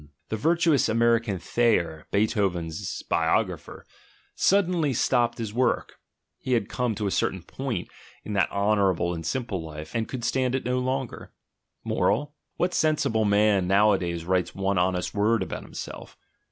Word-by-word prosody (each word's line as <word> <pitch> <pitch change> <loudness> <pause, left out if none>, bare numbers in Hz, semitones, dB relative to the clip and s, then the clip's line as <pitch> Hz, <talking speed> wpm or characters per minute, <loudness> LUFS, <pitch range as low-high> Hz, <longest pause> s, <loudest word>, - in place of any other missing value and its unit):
The - - -1
virtuous 165 +3 +2
American 115 -2 +2
Thayer, 85 -5 0
Beethoven's 95 -4 -1
biographer, - - -1 0.5
suddenly 180 -7 +2
stopped 120 0 +1
his 110 -3 -4
work: 125 +1 0 0.4
he 130 - -2
had 115 -5 +1
come 125 -3 -1
to 105 0 -3
a 100 - 0
certain 95 -2 -1
point 130 +5 -4 0.4
in 105 - -5
that 100 -2 +2
honourable 100 -4 +1
and 80 -1 -5
simple 100 +1 -2
life, 75 -1 -8
and 115 -1 -1
could 125 -3 -6
stand 130 0 +1
it 130 - -3
no 125 +1 0
longer. 130 0 -3 0.5
Moral: 145 0 0 0.2
What 180 +1 0
sensible 150 -10 +1
man 100 -2 +3
nowadays 95 -4 +2
writes 90 0 0
one 95 -1 0
honest 90 0 0
word 105 +1 +2
about - - -5
himself? - - -9
105 Hz, 145 wpm, -26 LUFS, 95-125 Hz, 0.5 s, man